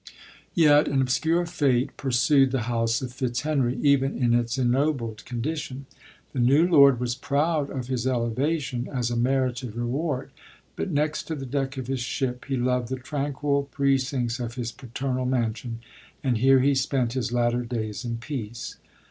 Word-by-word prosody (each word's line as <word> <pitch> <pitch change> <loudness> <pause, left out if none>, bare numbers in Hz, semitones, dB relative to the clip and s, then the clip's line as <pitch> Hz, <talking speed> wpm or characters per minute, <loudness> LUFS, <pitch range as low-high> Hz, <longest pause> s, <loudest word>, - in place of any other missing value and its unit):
Yet 150 -3 +5
an 140 - +1
obscure 160 +7 +1
fate 140 -7 +1
pursued 135 +1 +3
the 130 -1 -1
house 115 0 0
of 125 -1 -5
Fit/henry, 130 0 -1
even 140 -1 +3
in 120 -2 +2
its 120 +1 +1
ennobled 125 -3 0
condition. 135 +2 -4 0.5
The 135 - -2
new 140 +8 +4
lord 140 -7 +6
was 120 -1 -1
proud 145 +3 0
of 130 -3 -4
his 125 -1 -2
elevation, 125 +1 -1
as 125 -3 -1
a - - -1
merited 125 -1 0
reward; 130 +4 -2 0.4
but - - -3
next 150 -1 0
to 160 - -3
the 135 -2 -6
deck 135 +1 -2
of 130 -2 -4
Iris 135 -1 -2
ship, 125 0 -2
he 135 -2 -2
loved 125 0 0
the 130 - -2
tranquil 140 +1 -2
precincts 135 -3 0
of 120 -1 -4
his 120 -2 -3
paternal 130 +1 -3
man 120 -4 +1
sion, 115 0 -7 0.4
and 125 -5 +1
here 135 +1 +5
he 140 +2 +3
spent 130 -2 0
his 130 -2 -2
latter 120 0 +1
days 115 -2 -4
in 115 -1 -3
peace. 115 -2 -6
130 Hz, 165 wpm, -25 LUFS, 120-140 Hz, 0.5 s, lord